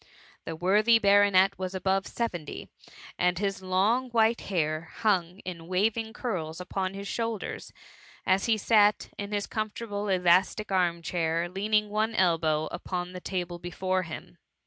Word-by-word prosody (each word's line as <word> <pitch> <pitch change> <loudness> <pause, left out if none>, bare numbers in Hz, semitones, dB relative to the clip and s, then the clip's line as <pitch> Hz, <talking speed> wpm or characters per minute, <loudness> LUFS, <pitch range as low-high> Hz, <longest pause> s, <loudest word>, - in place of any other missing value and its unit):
The 165 - -4
worthy 210 +7 +4
baronet 200 -2 +4
was 185 0 -4
above 190 +1 0
seventy; 175 -11 -4 0.5
and 180 -1 +2
his 195 -1 -2
long 200 +8 +1
white 230 0 +2
hair 160 -3 -2
hung 185 -5 +1
in 170 -3 -7
waving 220 +5 0
curls 165 -10 -4
upon 185 +1 -3
his 200 0 -6
shoulders, 225 -2 -4 0.5
as 190 +1 +2
he 225 -2 +2
sat 210 -1 +3
in 200 0 -5
his 205 -1 -1
comfortable 215 -1 -4
elastic 185 +3 +2
arm 175 -3 +1
chair, 165 0 0
leaning 210 +3 0
one 215 +1 0
elbow 160 -4 +2
upon 180 -1 -4
the 180 - -7
table 175 -2 -4
before 185 +2 -1
him. 160 - -9
190 Hz, 145 wpm, -28 LUFS, 175-210 Hz, 0.5 s, worthy